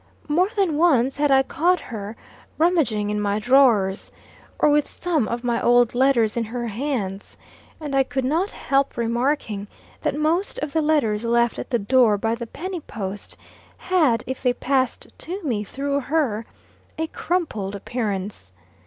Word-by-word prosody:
More 350 Hz, +6 st, +2 dB
than 375 Hz, -7 st, +1 dB
once 275 Hz, -6 st, +3 dB
had 295 Hz, 0 st, +2 dB
I 270 Hz, -1 st, +5 dB
caught 350 Hz, +6 st, +1 dB
her 215 Hz, -4 st, -7 dB, 0.4 s
rummaging 290 Hz, -12 st, +2 dB
in 210 Hz, 0 st, -1 dB
my 205 Hz, 0 st, 0 dB
drawers, 220 Hz, -5 st, +3 dB, 0.5 s
or -, -, +3 dB
with 295 Hz, 0 st, +3 dB
some 320 Hz, -10 st, -1 dB
of 235 Hz, +1 st, -3 dB
my 240 Hz, -1 st, 0 dB
old 240 Hz, -1 st, +4 dB
letters 245 Hz, -4 st, +3 dB
in 235 Hz, -1 st, -1 dB
her 240 Hz, +2 st, -4 dB
hands; 215 Hz, -5 st, -4 dB, 0.4 s
and 295 Hz, -3 st, -5 dB
I 270 Hz, -, +4 dB
could 265 Hz, 0 st, -2 dB
not 330 Hz, +9 st, +1 dB
help 275 Hz, -8 st, 0 dB
remarking 235 Hz, -3 st, -1 dB, 0.3 s
that -, -, -1 dB
most 320 Hz, +6 st, 0 dB
of 300 Hz, -, -4 dB
the 320 Hz, -, +2 dB
letters 265 Hz, -9 st, +1 dB
left 235 Hz, 0 st, +1 dB
at -, -, -6 dB
the 240 Hz, -, +2 dB
door 225 Hz, 0 st, +3 dB
by 225 Hz, +3 st, -1 dB
the 235 Hz, 0 st, -5 dB
penny 365 Hz, +8 st, -5 dB
post, 200 Hz, -8 st, -7 dB, 0.4 s
had, 305 Hz, -12 st, +2 dB
if 260 Hz, +1 st, -5 dB
they 250 Hz, -2 st, +2 dB
passed 260 Hz, 0 st, 0 dB
to 375 Hz, +4 st, -5 dB
me 230 Hz, -8 st, -1 dB
through 280 Hz, +6 st, -2 dB
her, 260 Hz, -6 st, -1 dB, 0.5 s
a 320 Hz, -, 0 dB
crumpled 315 Hz, -, -2 dB
appearance. 200 Hz, -, -4 dB
255 Hz, 160 wpm, -23 LUFS, 220-300 Hz, 0.5 s, I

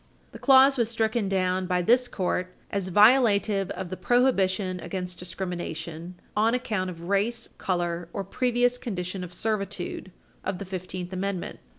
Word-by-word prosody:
The -, -, -10 dB
clause 270 Hz, 0 st, +6 dB
was 230 Hz, -2 st, +2 dB
stricken 220 Hz, -2 st, 0 dB
down 185 Hz, -1 st, 0 dB
by 180 Hz, -1 st, +1 dB
this 245 Hz, +6 st, +4 dB
Court 185 Hz, -2 st, -2 dB, 0.2 s
as 195 Hz, -2 st, -1 dB
violative 210 Hz, -2 st, +4 dB
of 185 Hz, -2 st, -5 dB
the -, -, -2 dB
prohibition 190 Hz, -4 st, +2 dB
against 180 Hz, -1 st, -5 dB
discrimination 175 Hz, -1 st, -5 dB, 0.2 s
"on 225 Hz, +3 st, +3 dB
account 215 Hz, -7 st, -2 dB
of 170 Hz, -2 st, -8 dB
race, 220 Hz, +4 st, 0 dB
color 175 Hz, -2 st, -2 dB
or 200 Hz, -, -3 dB
previous 245 Hz, +4 st, +1 dB
condition 185 Hz, -5 st, -4 dB
of 180 Hz, -, -7 dB
servitude" 195 Hz, -2 st, -3 dB, 0.3 s
of 190 Hz, -1 st, -2 dB
the 200 Hz, -, -6 dB
Fifteenth 185 Hz, -1 st, -6 dB
Amendment. 185 Hz, -1 st, -3 dB
190 Hz, 150 wpm, -26 LUFS, 180-225 Hz, 0.3 s, clause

